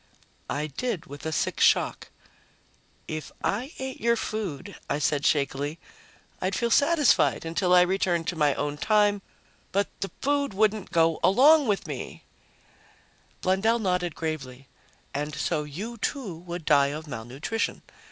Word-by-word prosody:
I 150 +2 -1
did, 175 - -3
with 145 +3 -8
a - - -2
sick - - -1
shock. - - +3 1.0
"If 155 -1 -5
I 245 +8 -1
ate 265 0 -6
your 235 +1 +3
food," 200 -5 -4
I - - +1
said 150 -1 +1
shakily, 145 +1 0 0.6
"I'd 190 +1 0
feel 235 -1 0
satisfied 295 - +3
until 180 +3 0
I 180 0 +8
was 180 - +3
returned 180 -3 +1
to 180 - -3
my 150 -3 +2
own 145 0 -3
time. 205 +1 +3 0.5
But 200 +1 +1
the 195 - -3
food 280 -5 0
wouldn't 215 -1 +1
go 165 -2 +2
along 280 +8 +6
with 205 -2 0
me!" - - -7 1.2
Blundell 195 +5 +2
nodded 180 -6 -1
gravely. 135 -5 -5 0.5
"And 150 +1 -3
so 150 +1 -1
you, 205 +11 -6
too, 230 - -3
would 170 0 -7
die 140 -2 +5
of 150 +3 -5
malnutrition. 135 - -4
180 Hz, 145 wpm, -26 LUFS, 150-215 Hz, 1.2 s, I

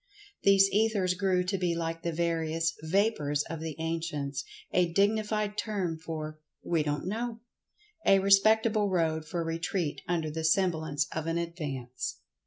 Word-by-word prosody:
These 195 0 +6
Ethers 205 -3 +2
grew 180 -1 +1
to 190 +1 -1
be 175 -2 +1
like 165 0 -3
the 170 - -2
various 165 -1 0
"Vapors" 155 -5 +1
of 165 - -4
the 160 -2 -5
ancients—a 165 +1 -2
dignified 210 +1 +1
term 185 -7 -2
for 155 -1 -6 0.2
"We 165 -2 +1
don't 145 0 -2
know"—a 240 - -2
respectable 210 +2 +4
road 160 -3 0
for 170 +2 -2
retreat 165 0 -2
under 165 -3 -1
the 160 +1 -4
semblance 160 -4 +1
of 160 0 -3
an 165 0 0
advance. 145 -8 -4
170 Hz, 135 wpm, -29 LUFS, 160-195 Hz, 0.2 s, These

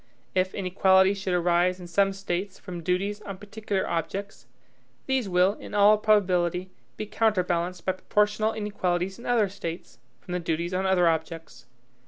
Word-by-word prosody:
If 185 0 0
inequalities 190 +1 +3
should 190 -2 -1
arise 175 +1 +2
in 180 - -9
some 195 +3 +2
States 195 0 -4
from 180 -3 -8
duties 195 +5 -1
on 195 -2 -7
particular 205 -1 -3
objects, 175 - -4 0.6
these 260 -6 0
will, 180 +2 +3
in 210 - -9
all 210 +1 +6
probability, 185 -4 +2 0.3
be 215 - -3
counterbalanced 180 -5 0
by 185 - +2
proportional 210 +3 +1
inequalities 190 -3 -2
in - - -9
other 235 -4 +3
States, 170 -10 -7 0.2
from - - -11
the 180 - -1
duties 170 +1 -2
on 190 +1 0
other 180 -2 +3
objects. 160 -6 -3
185 Hz, 155 wpm, -26 LUFS, 175-205 Hz, 0.6 s, all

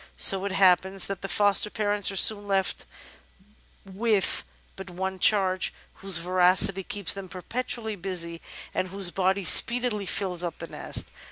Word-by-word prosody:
So 195 0 +5
it 200 - -3
happens 190 0 +2
that 195 -2 -5
the 195 - -5
foster 205 0 +1
parents 205 -1 0
are 195 - -4
soon 205 +1 +3
left 195 -1 -1 1.0
with 200 - 0 0.3
but 190 - -9
one 190 +1 -5
charge, 190 -2 +3 0.3
whose 195 -3 0
voracity 185 +2 +2
keeps 200 0 -5
them 195 -2 -9
perpetually 220 +3 -4
busy 170 -3 -4 0.3
and 185 - -2
whose 190 -1 0
body 190 +1 -1
speedily 235 +1 +4
fills 180 -3 -2
up 170 -2 -5
the - - -7
nest. - - -2
195 Hz, 150 wpm, -25 LUFS, 185-205 Hz, 1.0 s, So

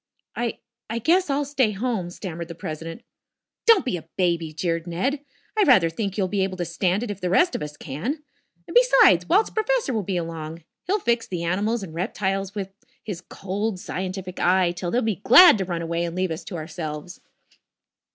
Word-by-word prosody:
"I 235 -1 -2 0.3
I 225 - -2
guess 340 +8 +2
I'll 285 +1 +1
stay 265 -6 +1
home," 205 -4 -2
stammered 170 -2 -6
the 170 - -8
president. 165 +7 -6 0.6
"Don't 455 -4 +6
be 215 -9 -1
a 165 -1 -12
baby," 170 -4 +1
jeered 165 +1 -2
Ned. 265 - -1 0.3
"I 430 - +2
rather 195 - +5
think 200 +2 -3
you'll 195 -3 +1
be 200 +1 -1
able 190 -1 -3
to 175 - -2
stand 180 +4 0
it 230 - -3
if 200 -1 -8
the 180 - -1
rest 345 - +4
of - - -3
us 150 0 -6
can. 235 - -4 0.4
And, - - -8
besides, - - +5
Walt's 405 +6 +3
professor 440 - 0
will 220 - 0
be 190 -1 -2
along. 165 -1 -5 0.2
He'll 400 +3 +2
fix 235 - 0
the 175 -2 -4
animals 205 +6 0
and 165 -4 -8
reptiles 195 +2 -2
with, 195 -2 -5 0.3
his 190 -5 -5
cold, 200 +1 -3
scientific 185 0 -5
eye 180 0 +3
till 175 0 -4
they'll 245 +7 +1
be 220 -5 0
glad 350 - +8
to 190 - -1
run 170 -2 -3
away 170 +1 -1
and 170 0 -5
leave 185 -1 0
us 160 - -4
to 190 - -7
ourselves." 155 +1 -6
190 Hz, 200 wpm, -24 LUFS, 170-235 Hz, 0.6 s, glad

